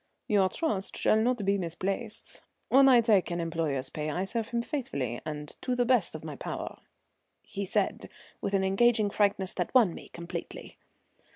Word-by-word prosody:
"Your 200 -3 +3
trust 205 - -2
shall 220 - +3
not 240 -3 +1
be 200 0 +2
misplaced. 190 +6 -4 0.3
When 270 +1 +7
I 245 -2 +7
take 215 -5 +3
an 170 0 -2
employer's 160 -6 -1
pay 150 0 -3
I 175 +5 -1
serve 220 +3 -2
him 235 0 -1
faithfully 140 - -3
and 150 -1 -6
to 250 - -1
the 245 0 +2
best 235 -10 +2
of 155 - -7
my 155 -2 -6
power," - - -6 0.6
he 200 0 -5
said - - -1 0.3
with 200 - -1
an 190 - +2
engaging 210 +2 +3
frankness 200 -2 +1
that 180 +7 -3
won 220 -9 +6
me - - -11
completely. 170 0 -8
195 Hz, 175 wpm, -29 LUFS, 170-235 Hz, 0.6 s, When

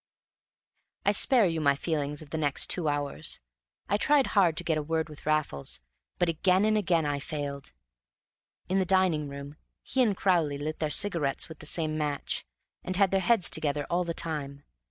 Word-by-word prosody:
I - - +5
spare 250 -6 +5
you 165 -3 -1
my 140 -2 +3
feelings 150 -1 -2
of 145 - -17
the 160 - -2
next 145 -3 +1
two 175 -4 0
hours. 145 - -1 0.5
I 205 - +1
tried 285 +4 +3
hard 180 -6 +3
to - - +1
get 160 -2 0
a - - -2
word 160 +2 -1
with 150 0 -12
Raffles, 155 - 0 0.4
but 175 - +1
again 185 +4 +2
and 215 0 +2
again 175 -6 +1
I 145 -1 -1
failed. 140 - -5 1.0
In 190 +2 +1
the - - +3
dining 180 -5 +2
room 140 +1 -9 0.3
he 265 - 0
and 210 -6 +2
Crowley 165 -7 +1
lit 155 +2 -5
their 155 - -1
cigarettes 165 -6 0
with 160 - -11
the - - -9
same 155 -2 0
match, 145 -2 -2 0.4
and 185 - -3
had 195 0 +3
their 195 - +3
heads 225 -3 +3
together 150 -2 +2
all 175 +1 +2
the 170 -1 -4
time. 145 -4 -4
160 Hz, 190 wpm, -28 LUFS, 145-185 Hz, 1.0 s, I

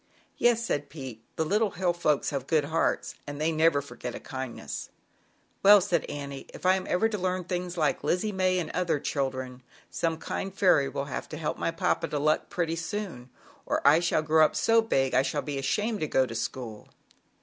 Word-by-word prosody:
"Yes," 235 -1 +3
said 145 -9 -2
Pete, 130 -7 -8
"the 160 - 0
Little 210 +5 +2
Hill 180 -1 0
Folks 155 -4 +1
have 135 -2 -3
good 155 -3 +2
hearts, 160 +3 0
and 145 0 -6
they 155 +2 +1
never 155 -2 +3
forget 125 -3 -7
a - - -6
kindness.". 130 -2 -6 0.7
"Well, 205 +1 +9
"'said 180 -3 0
Annie, 140 -1 -6
"if - - -11
ever - - +5
I 185 - +6 0.3
am 225 - +5
to 210 - -1
learn 185 0 -1
things 180 0 -4
like 155 -3 +1
Lizzie 210 +4 0
May 185 -1 +1
and 170 -4 -2
other 175 -4 0
children, 130 -3 -3 0.3
some 165 -1 -1
kind 195 +4 -4
Fairy 170 -8 +3
will 140 - -3
have 140 - -5
t 155 - -6
help 155 -1 -3
my - - 0
papa 165 0 0
to 150 - -3
luck 155 +2 +1
pretty 165 -2 -1
soon 170 - -5 0.4
or - - +1
I 150 +3 +7
shall 170 -2 +1
grow 155 0 +4
so 225 0 +4
big 135 - +1
I 130 - +5
shall 145 +2 -2
be 145 -2 -3
ashamed 210 +11 0
to 155 - -1
go 130 -2 +3
to 120 - -7
school." 115 -1 -5
160 Hz, 205 wpm, -28 LUFS, 140-180 Hz, 0.7 s, Well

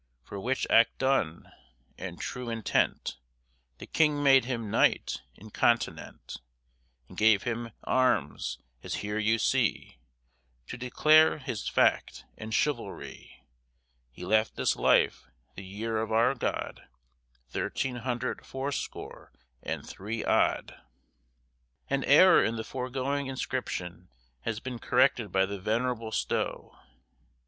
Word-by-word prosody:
For 100 - -8
which 130 +6 -1
act 115 - +4
done, 130 -12 0 0.4
and - - -7
trew 125 -1 -5
entent, 115 -2 0 0.6
The - - -9
Kyng 150 -2 +2
made 135 -3 +6
him 120 -3 -3
knyght - - +2 0.2
incontinent 110 - -2 0.7
And - - -14
gave 110 -3 +4
him 115 0 -3
armes, 105 - 0 0.2
as - - -4
here 105 +1 -2
you 110 +1 +2
see, 65 - 0 0.7
To - - -5
declare 155 +6 +4
his 120 -7 -5
fact - - +1
and 110 0 -8
chivaldrie. 145 +6 -3 0.7
He 80 +8 -9
left 110 +3 +2
this - - +1
lyff - - +2 0.3
the 100 - -9
yere 110 +4 -4
of 110 0 -4
our 115 +4 +3
God 130 - -4 0.6
Thirteen 125 - -2
hundred 125 0 -3
fourscore 135 +2 -6 0.3
and - - -5
three 110 +4 -5
odd. - - +1 1.1
An 135 -1 +1
error 185 +7 +7
in 115 - 0
the 110 - -4
foregoing 135 +3 -3
inscription 95 -9 -4 0.4
has 110 -2 -2
been 125 -1 -6
corrected 125 -7 +2
by 95 +1 +3
the 100 0 -6
venerable 115 +2 -1
Stow. - - -2
115 Hz, 120 wpm, -29 LUFS, 110-130 Hz, 1.1 s, error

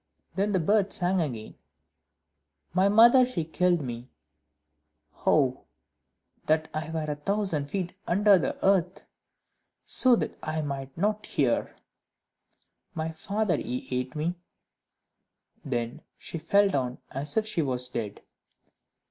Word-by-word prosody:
Then 200 +2 0
the 190 - +2
bird 200 +4 +2
sang 180 0 +2
again 120 -8 -5 1.1
"My 190 +2 +3
mother, 235 +5 +7
she 245 -10 -2
killed 175 +1 +1
me;" 120 -1 -6 1.2
"Oh, - - +2 0.8
that 155 0 +2
I 155 +1 -4
were 160 -1 -3
a 150 - -2
thousand 165 -4 -1
feet 185 -1 -3
under 200 +2 +5
the - - -2
earth, 190 -2 +2 0.8
so 255 -2 +5
that - - -3
I 155 0 -3
might 135 -1 -5
not 210 +4 -1
hear!" 130 -6 0 1.2
"My 160 0 -2
father, 195 +2 -1
he 125 -1 -4
ate 125 +1 -2
me," 155 +3 -1 1.3
Then 120 +2 -3 0.2
she 165 - -6
fell 200 +6 +3
down, 130 -9 -1
as 145 +5 -3
if 220 - +2
she 215 -6 -1
was 125 -3 0
dead. 115 -5 -5
160 Hz, 125 wpm, -27 LUFS, 140-195 Hz, 1.3 s, mother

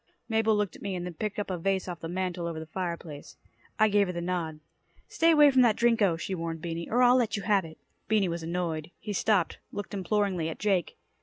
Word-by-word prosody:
Mabel 220 -1 +2
looked 210 -2 -1
at - - -14
me 195 -2 -3
and 175 -1 -4
then 180 - -5
picked 210 +5 -4
up 205 -2 -3
a 180 - -3
vase 190 +2 0
off 175 -2 -5
the 165 - -6
mantle 180 -1 -2
over 165 -2 -4
the 160 - -7
fire 170 +1 -3
place. 150 -4 -11 0.4
I 215 - +5
gave 205 -1 +3
her 180 - -3
the 170 - -3
nod. 170 -3 -3 0.5
"Stay 330 - +2
away 300 -3 +7
from 260 -1 +5
that 235 -4 +4
Drinko," 225 -8 +3
she 190 - -4
warned 165 -2 -4
Beany, 165 0 -5
"or 245 +3 +3
I'll 245 +1 +6
let 225 -4 +1
you 200 - -5
have 200 -4 +2
it." 160 -1 -11 0.3
Beany 215 -3 +2
was 170 0 -3
annoyed. 165 -2 -3
He 210 - -5
stopped, 200 -3 +1
looking 205 0 -5
imploringly 190 -4 0
at 160 - -6
Jake. 195 -5 0
185 Hz, 240 wpm, -28 LUFS, 170-210 Hz, 0.5 s, away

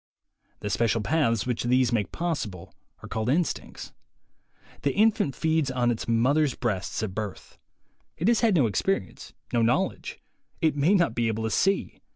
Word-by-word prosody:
The 105 - -3
special 115 +3 +1
paths 115 -2 +1
which 125 -2 -1
these 125 0 +3
make 110 -4 0
possible 130 - -4 0.3
are - - -7
called 110 +1 -2
instincts. 160 +3 -2 0.9
The 140 - +1
in 220 +2 +5
fant 140 -9 -2
feeds 160 -3 +1
on 125 -2 +1
its 115 - -4
mother's 130 +5 +2
breasts 105 -4 -2
at 100 -4 -3
birth. 105 -2 -6 0.6
It 175 - -1
has 235 -1 +4
had 225 -5 +3
no 145 -7 +4
experience, 105 - -2 0.2
no 120 - +3
knowledge; 115 +2 0 0.4
it 160 -2 +2
may 150 +8 +3
not 170 - +2
be 120 0 0
able 110 0 -2
to 110 - -1
see. 195 - 0
125 Hz, 170 wpm, -26 LUFS, 110-160 Hz, 0.9 s, in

